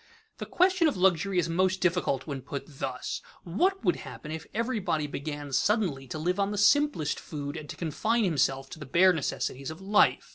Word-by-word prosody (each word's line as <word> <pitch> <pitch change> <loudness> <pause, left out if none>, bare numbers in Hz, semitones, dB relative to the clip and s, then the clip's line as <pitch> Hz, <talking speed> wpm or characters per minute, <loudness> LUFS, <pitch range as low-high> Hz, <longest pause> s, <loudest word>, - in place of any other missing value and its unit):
_ - - -45
The - - -5
question 365 -2 +3
of 290 - 0
luxury 185 +1 +2
is 170 -2 +2
most 185 +3 +1
difficult 180 -7 +1
when 140 -4 -5
put 140 +1 -5
thus: 135 -3 -5 0.2
What 360 - 0
would 175 - +3
happen 150 - -9
if 160 0 -6
everybody 210 -9 -1
began 145 -1 -5
suddenly 165 - +1
to 125 - -5
live 180 +5 -1
on 200 0 +2
the 205 - -3
simplest 205 - +3
food 145 -1 -6
and 150 -1 -7
to - - -6
confine 215 +8 0
himself 135 -6 +1
to - - -8
the 150 - -8
bare 180 +6 +5
necessities 140 -3 -3
of 160 +2 -8
life? 200 +2 +3
170 Hz, 195 wpm, -28 LUFS, 145-200 Hz, 0.2 s, bare